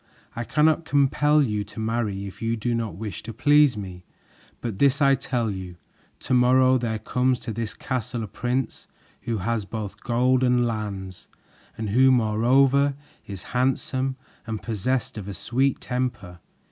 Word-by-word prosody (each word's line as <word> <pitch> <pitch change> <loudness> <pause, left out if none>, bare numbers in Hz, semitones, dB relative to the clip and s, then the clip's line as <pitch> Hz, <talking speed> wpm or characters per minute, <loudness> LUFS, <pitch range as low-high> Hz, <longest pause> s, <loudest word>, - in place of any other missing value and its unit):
I 120 +1 -3
cannot 155 +4 +2
compel 145 +1 +3
you 105 -5 -1
to 105 - -10
marry 110 -3 -2
if 95 0 -10
you 115 0 -1
do 120 +2 -1
not 115 -6 -2
wish 105 +2 -6
to 115 +2 -7
please 145 +2 +4
me; 90 -3 -7 0.6
but 110 -5 -5
this 140 0 +4
I 140 -2 +5
tell 125 -4 -1
you. 95 -2 -7 0.5
To 130 - -2
morrow 130 +1 +5
there 115 -2 -2
comes 125 +4 0
to 110 - -5
this 110 -1 -4
castle 125 -2 -3
a - - -5
prince 125 +5 -3 0.3
who 115 -2 -2
has 110 +3 -1
both 105 0 -6
gold 125 +2 +2
and 125 -1 +3
lands, 100 -5 -5 0.5
and 110 -2 -3
who 130 +4 +5
moreover 130 +5 +3 0.3
is 100 -2 -7
handsome 130 +1 0 0.3
and 110 -1 -3
possessed 115 +2 -2
of 100 - -8
a 100 - -5
sweet 130 +8 0
temper. 120 -9 -4
120 Hz, 160 wpm, -24 LUFS, 105-130 Hz, 0.6 s, I